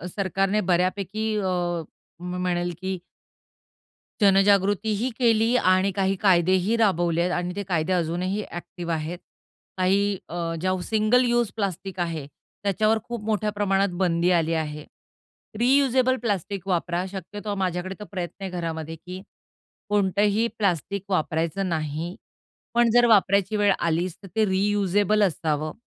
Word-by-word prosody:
सरकारने 195 Hz, +1 st, 0 dB
बऱ्यापैकी 195 Hz, +4 st, 0 dB
अ, 175 Hz, -3 st, -1 dB, 0.4 s
म्हणेल 180 Hz, -1 st, -2 dB
की 190 Hz, 0 st, -2 dB, 1.2 s
जनजागृतीही 200 Hz, +3 st, +3 dB
केली 230 Hz, 0 st, +3 dB
आणि 185 Hz, 0 st, +3 dB
काही 195 Hz, +1 st, 0 dB
कायदेही 185 Hz, +2 st, +3 dB
राबवले 175 Hz, -6 st, +2 dB
आहेत 180 Hz, +1 st, 0 dB
आणि 180 Hz, +1 st, -3 dB
ते 205 Hz, -, -3 dB
कायदे 175 Hz, 0 st, 0 dB
अजूनही 180 Hz, +4 st, -1 dB
ॲक्टिव्ह 175 Hz, 0 st, -5 dB
आहेत. 160 Hz, +3 st, -3 dB, 0.6 s
काही 195 Hz, +2 st, +2 dB
अ, 170 Hz, -, -6 dB, 0.3 s
ज्या 185 Hz, 0 st, +1 dB
सिंगल 220 Hz, +3 st, +3 dB
यूज 240 Hz, -3 st, +1 dB
प्लास्टिक 195 Hz, -2 st, -3 dB
आहे, 165 Hz, -4 st, -2 dB, 0.4 s
त्याच्यावर 215 Hz, +3 st, +2 dB
खूप 235 Hz, -3 st, -6 dB
मोठ्या 215 Hz, -1 st, 0 dB
प्रमाणात 200 Hz, -1 st, +1 dB
बंदी 175 Hz, 0 st, +2 dB
आली 165 Hz, -1 st, +2 dB
आहे. 150 Hz, -1 st, -3 dB, 0.7 s
रियुजेबल 260 Hz, 0 st, +3 dB
प्लास्टिक 200 Hz, -3 st, -2 dB
वापरा. 175 Hz, 0 st, 0 dB
शक्यतो 205 Hz, +2 st, -5 dB
माझ्याकडे 185 Hz, 0 st, -2 dB
तर 210 Hz, -, -7 dB
प्रयत्न 185 Hz, +1 st, -5 dB
आहे 190 Hz, -, -3 dB
घरामध्ये, 165 Hz, -2 st, -4 dB
की 180 Hz, +3 st, -9 dB, 0.7 s
कोणतंही 205 Hz, +2 st, +2 dB
प्लास्टिक 195 Hz, -1 st, -1 dB
वापरायचं 170 Hz, +2 st, -1 dB
नाही 160 Hz, +2 st, -3 dB, 0.6 s
पण 240 Hz, 0 st, +4 dB
जर 240 Hz, 0 st, +5 dB
वापरायची 200 Hz, -1 st, +3 dB
वेळ 205 Hz, -1 st, +4 dB
आलीच, 170 Hz, +1 st, 0 dB
तर -, -, -9 dB
ते 220 Hz, -1 st, +3 dB
रियुजेबल 205 Hz, +1 st, +2 dB
असावं. 155 Hz, -3 st, -1 dB
190 Hz, 130 wpm, -25 LUFS, 175-205 Hz, 1.2 s, जर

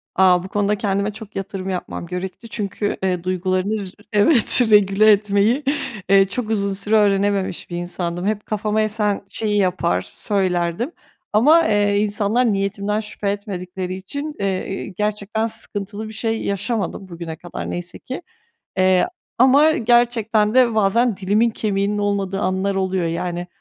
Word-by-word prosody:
A, 180 Hz, -2 st, +4 dB
bu -, -, -6 dB
konuda 205 Hz, +1 st, 0 dB
kendime 200 Hz, 0 st, -1 dB
çok 215 Hz, -1 st, -10 dB
yatırım 195 Hz, -1 st, -4 dB
yapmam 180 Hz, -2 st, -4 dB
gerekti. 185 Hz, +6 st, -6 dB
Çünkü, 205 Hz, -1 st, -2 dB
eee, 180 Hz, -2 st, 0 dB
duygularını 185 Hz, +3 st, 0 dB
r -, -, -11 dB, 0.2 s
evet, 230 Hz, +4 st, +4 dB
regüle 210 Hz, +1 st, +6 dB
etmeyi, 210 Hz, +6 st, +2 dB, 0.5 s
eee, 195 Hz, 0 st, +6 dB
çok 220 Hz, +3 st, -4 dB
uzun 200 Hz, -2 st, 0 dB
süre 205 Hz, +3 st, 0 dB
öğrenememiş 200 Hz, -3 st, +1 dB
bir 175 Hz, -, -4 dB
insandım. 175 Hz, 0 st, -3 dB
Hep 210 Hz, -1 st, -1 dB
kafama 215 Hz, 0 st, 0 dB
esen 210 Hz, -1 st, 0 dB
şeyi 210 Hz, -2 st, -1 dB
yapar, 180 Hz, -3 st, 0 dB
söylerdim 185 Hz, -, -1 dB, 0.4 s
ama, 305 Hz, +10 st, +5 dB
eee, 205 Hz, -1 st, +2 dB
insanlar 210 Hz, +3 st, +1 dB
niyetimden 200 Hz, +1 st, -1 dB
şüphe 210 Hz, -1 st, -4 dB
etmedikleri 185 Hz, -3 st, -5 dB
için, 285 Hz, +11 st, -5 dB
eee, 195 Hz, -2 st, -1 dB
iii, 195 Hz, 0 st, -5 dB
gerçekten 210 Hz, +2 st, -1 dB
sıkıntılı 205 Hz, -1 st, -5 dB
bir 215 Hz, -, -9 dB
şey 225 Hz, +1 st, -2 dB
yaşamadım 200 Hz, -1 st, -2 dB
bugüne 170 Hz, -2 st, -6 dB
kadar 175 Hz, +1 st, -7 dB
neyse 175 Hz, 0 st, -6 dB
ki. 260 Hz, +5 st, -6 dB, 0.6 s
Eee, 185 Hz, -, +4 dB, 0.3 s
ama 270 Hz, +5 st, +6 dB
gerçekten 230 Hz, -3 st, +2 dB
de 250 Hz, -3 st, +4 dB
bazen 220 Hz, +1 st, +2 dB
dilimin 210 Hz, +5 st, +2 dB
kemiğinin 205 Hz, -1 st, -1 dB
olmadığı 200 Hz, -1 st, -1 dB
anlar 190 Hz, +1 st, 0 dB
oluyor, 190 Hz, -2 st, 0 dB
yani. 175 Hz, +1 st, -3 dB
200 Hz, 145 wpm, -21 LUFS, 190-215 Hz, 0.6 s, regüle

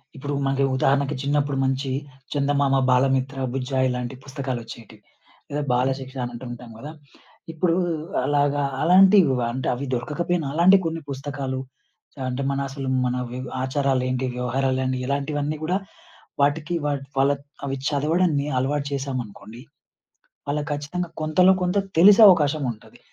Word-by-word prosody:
ఇప్పుడు 145 Hz, +1 st, -4 dB
మరి 135 Hz, 0 st, +1 dB
ఉదాహరణకు, 140 Hz, +2 st, +1 dB
చిన్నపుడు 145 Hz, 0 st, 0 dB
మంచి 135 Hz, 0 st, -1 dB, 0.4 s
చందమామ, 140 Hz, -1 st, +1 dB
బాలమిత్ర, 135 Hz, +1 st, +2 dB, 0.2 s
బుజ్జాయి, 130 Hz, 0 st, 0 dB
ఇలాంటి 125 Hz, +1 st, -4 dB
పుస్తకాలోచ్చేటివి 120 Hz, -5 st, -7 dB, 0.5 s
లేద, 145 Hz, +1 st, -1 dB
బాలశిక్ష 130 Hz, +1 st, -1 dB
అనంటుంటాం 120 Hz, 0 st, -8 dB
గదా! 145 Hz, +6 st, -8 dB, 0.6 s
ఇప్పుడు 165 Hz, +1 st, +1 dB, 0.5 s
అలాగా, 145 Hz, 0 st, +1 dB, 0.2 s
అలాంటివి 185 Hz, -3 st, +6 dB, 0.2 s
అంటే, 130 Hz, +2 st, -3 dB
అవి 135 Hz, +3 st, -5 dB
దొరకకపోయినా 155 Hz, +5 st, -2 dB
అలాంటి 180 Hz, +4 st, +6 dB
కొన్ని 165 Hz, 0 st, -2 dB
పుస్తకాలు 135 Hz, -1 st, -4 dB, 0.7 s
అంటే, 125 Hz, +2 st, -3 dB
మన 140 Hz, -, -1 dB
అసలు 135 Hz, 0 st, -6 dB, 0.2 s
మన 125 Hz, 0 st, 0 dB, 0.2 s
వివ్ 130 Hz, +1 st, -5 dB, 0.2 s
ఆచారాలెంటి? 130 Hz, -1 st, 0 dB
వ్యవహారాలన్ని, 130 Hz, +1 st, -1 dB
ఇలాంటివన్నీ 145 Hz, +2 st, -2 dB
గూడా 180 Hz, +4 st, +1 dB, 0.6 s
వాటికి, 150 Hz, +4 st, +1 dB
వాట్‌ 140 Hz, -2 st, -2 dB
వాళ్ 140 Hz, +1 st, +4 dB, 0.3 s
అవి 135 Hz, -1 st, -2 dB
చదవడాన్ని 150 Hz, +1 st, +1 dB
అలవాటు 140 Hz, +2 st, -1 dB
చేశామనుకోండి, 125 Hz, -5 st, -5 dB, 0.9 s
వాళ్ళ 145 Hz, +1 st, 0 dB
కచ్చితంగా 155 Hz, +5 st, -4 dB
కొంతలో 170 Hz, +5 st, +4 dB
కొంత, 180 Hz, +2 st, 0 dB, 0.2 s
తెలిసే 205 Hz, +5 st, +8 dB
అవకాశముంటది. 145 Hz, -, 0 dB
140 Hz, 115 wpm, -23 LUFS, 130-150 Hz, 0.9 s, తెలిసే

